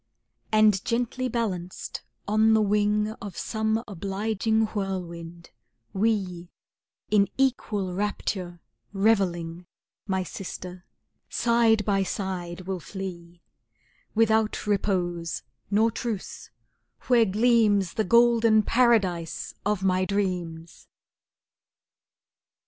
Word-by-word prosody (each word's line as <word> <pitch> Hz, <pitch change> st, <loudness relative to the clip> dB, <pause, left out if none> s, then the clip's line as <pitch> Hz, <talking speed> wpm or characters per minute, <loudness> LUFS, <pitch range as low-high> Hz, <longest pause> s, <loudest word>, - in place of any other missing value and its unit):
And 215 Hz, -3 st, +4 dB
gently 245 Hz, +2 st, -1 dB
balanced 195 Hz, -7 st, -3 dB, 0.3 s
on 220 Hz, +1 st, +4 dB
the 220 Hz, -, +4 dB
wing 210 Hz, +1 st, +2 dB
Of 200 Hz, -4 st, -7 dB
some 220 Hz, 0 st, -1 dB
obliging 210 Hz, +3 st, 0 dB
whirlwind, 175 Hz, -4 st, -5 dB, 0.4 s
we 190 Hz, -4 st, -1 dB, 0.6 s
In 200 Hz, -2 st, +4 dB
equal 215 Hz, -8 st, 0 dB
rapture 185 Hz, -3 st, -3 dB, 0.3 s
revelling 180 Hz, -5 st, +1 dB, 0.4 s
My 190 Hz, -1 st, 0 dB
sister, 180 Hz, 0 st, -8 dB, 0.4 s
side 230 Hz, -3 st, +3 dB
by 195 Hz, -2 st, +2 dB
side 185 Hz, -2 st, -4 dB
will 185 Hz, 0 st, -4 dB
flee, 175 Hz, -2 st, -8 dB, 0.7 s
Without 220 Hz, -1 st, +2 dB
repose, 180 Hz, -5 st, -1 dB, 0.3 s
nor 220 Hz, +3 st, +3 dB
truce, 220 Hz, -3 st, -5 dB, 0.5 s
where 240 Hz, -3 st, +4 dB
gleams 210 Hz, -3 st, +3 dB
The 220 Hz, -, 0 dB
golden 230 Hz, 0 st, +5 dB
Paradise 205 Hz, -9 st, +1 dB
of 205 Hz, -2 st, 0 dB
my 185 Hz, -1 st, +2 dB
dreams! 180 Hz, -5 st, -3 dB
200 Hz, 90 wpm, -26 LUFS, 180-220 Hz, 0.7 s, golden